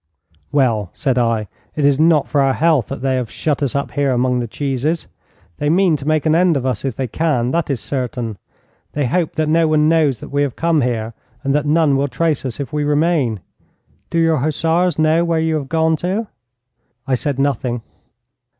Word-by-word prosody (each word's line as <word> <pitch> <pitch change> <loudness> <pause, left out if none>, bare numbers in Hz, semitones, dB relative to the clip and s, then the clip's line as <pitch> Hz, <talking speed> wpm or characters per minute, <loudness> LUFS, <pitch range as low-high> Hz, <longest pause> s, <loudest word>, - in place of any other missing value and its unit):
'Well,' 115 -9 +1
said 130 -5 0
I, 115 -3 0 0.3
'it 150 - 0
is 140 0 +3
not 160 -2 +4
for 145 - +1
our 135 -1 +2
health 160 -7 +2
that - - -6
they 130 -1 +1
have 125 -3 -3
shut 150 -2 -2
us 140 -2 -1
up 140 - -2
here 145 -1 0
among 125 0 +1
the 120 - -2
cheeses. 140 +6 -2 0.5
They 145 - 0
mean 175 0 +3
to 140 +1 -8
make 155 -1 +1
an 155 - +3
end 170 -2 +3
of 130 - -3
us 125 -6 -1
if 135 -4 -2
they 130 - -2
can. 125 -3 0
That 170 +1 -1
is 135 -4 -1
certain. 120 -5 -4 0.5
They 145 -2 0
hope 165 +6 0
that 155 -1 0
no 165 +1 +3
one 155 -1 +3
knows 155 -7 +2
that - - -9
we 145 0 0
have 140 -4 -1
come 165 -2 +1
here, 115 -2 -2 0.3
and 135 -1 0
that 150 0 0
none 155 -2 +3
will 140 +1 +1
trace 155 0 -1
us 130 0 -4
if 140 +2 -5
we 150 0 0
remain. 145 - +1 0.7
Do - - -2
your 165 -1 +3
hussars 160 +4 +1
know 155 +2 +3
where 165 -1 +1
you 160 0 0
have 140 -3 -6
gone 160 0 +2
to?' 190 +8 -2 0.8
'I 135 - -1
said 135 +2 -1
nothing.' 130 -4 -1
145 Hz, 210 wpm, -18 LUFS, 130-160 Hz, 0.8 s, not